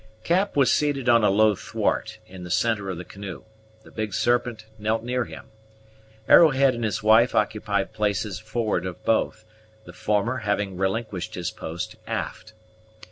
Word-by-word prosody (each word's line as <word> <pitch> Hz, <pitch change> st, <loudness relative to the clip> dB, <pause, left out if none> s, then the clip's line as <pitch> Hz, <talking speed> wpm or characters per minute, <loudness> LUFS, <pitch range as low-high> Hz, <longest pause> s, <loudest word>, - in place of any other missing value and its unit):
Cap 190 Hz, +4 st, +1 dB
was 135 Hz, -2 st, +4 dB
seated 145 Hz, -4 st, 0 dB
on 115 Hz, -2 st, +5 dB
a 105 Hz, -, +5 dB
low 105 Hz, +2 st, +4 dB
thwart, -, -, -2 dB
in 90 Hz, -1 st, -11 dB
the 90 Hz, -, -8 dB
centre 105 Hz, -1 st, 0 dB
of 90 Hz, -, -4 dB
the 90 Hz, -, -7 dB
canoe; 95 Hz, 0 st, -8 dB, 0.4 s
the -, -, -16 dB
Big 110 Hz, -3 st, -4 dB
Serpent 120 Hz, -2 st, 0 dB
knelt 110 Hz, +1 st, -1 dB
near 125 Hz, 0 st, -1 dB
him. -, -, -11 dB, 0.8 s
Arrowhead 140 Hz, -5 st, +6 dB
and 120 Hz, -1 st, -4 dB
his 110 Hz, -1 st, -2 dB
wife 110 Hz, +3 st, +5 dB
occupied 100 Hz, -2 st, 0 dB
places 105 Hz, -2 st, -1 dB
forward 105 Hz, -3 st, -2 dB
of 90 Hz, -, -9 dB
both, 110 Hz, -1 st, 0 dB, 0.4 s
the 85 Hz, -, -11 dB
former 105 Hz, +7 st, 0 dB
having 105 Hz, -3 st, -1 dB
relinquished 95 Hz, +1 st, -2 dB
his 90 Hz, -3 st, -3 dB
post 85 Hz, +3 st, -6 dB
aft. 110 Hz, -, -5 dB
110 Hz, 160 wpm, -24 LUFS, 95-120 Hz, 0.8 s, Arrowhead